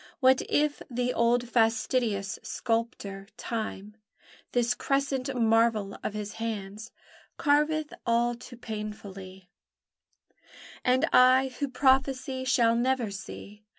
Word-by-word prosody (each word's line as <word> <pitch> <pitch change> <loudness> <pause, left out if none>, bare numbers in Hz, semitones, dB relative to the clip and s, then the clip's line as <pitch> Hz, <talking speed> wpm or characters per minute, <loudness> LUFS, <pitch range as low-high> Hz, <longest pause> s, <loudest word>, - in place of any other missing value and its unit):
What 260 -2 +5
if 295 0 +1
the 250 0 -1
old 240 +1 +2
fastidious 225 -3 +1
sculptor, 220 -3 -3
Time, 215 -2 -5 0.5
This 245 -1 +2
crescent 275 +1 -1
marvel 225 -3 +2
of 210 - -4
his 210 -1 -5
hands 215 0 -5 0.5
Carveth 300 +1 +1
all 235 0 +2
too 240 +1 -11
painfully, 195 -4 -8 1.3
And 255 +4 +3
I 255 +1 +6
who 285 - 0
prophesy 265 0 +1
shall 235 -3 +3
never 245 -2 0
see? 210 0 -9
235 Hz, 105 wpm, -28 LUFS, 215-260 Hz, 1.3 s, I